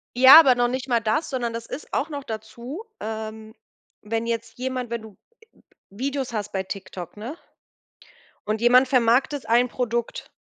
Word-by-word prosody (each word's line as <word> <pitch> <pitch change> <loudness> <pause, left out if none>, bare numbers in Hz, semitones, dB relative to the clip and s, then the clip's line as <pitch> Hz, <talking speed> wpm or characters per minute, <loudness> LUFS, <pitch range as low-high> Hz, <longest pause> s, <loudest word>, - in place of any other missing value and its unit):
Ja, 260 +5 +10
aber 265 -5 +4
noch 245 0 +2
nicht 260 +2 -4
mal 240 -1 +3
das, 230 +9 -1
sondern 245 -4 -2
das 230 0 -6
ist 300 - -8
auch 285 +4 -1
noch 285 -3 -6
dazu, 235 - -7 0.2
ähm, 220 0 -6 0.5
wenn 225 +2 -3
jetzt 230 -1 -4
jemand 255 -1 -3
wenn 235 -1 -3
du 220 - -11 0.4
ä - - -27 0.3
Videos 265 +4 -4
hast 210 -2 -3
bei 190 -1 -2
TikTok, 185 -3 -8
ne? 240 +10 -7 1.1
Und 215 +1 -2
jemand 250 +2 +5
vermarktet 255 +2 +2
ein 240 +2 +4
Produkt 235 -1 -3
235 Hz, 165 wpm, -24 LUFS, 220-260 Hz, 1.1 s, Ja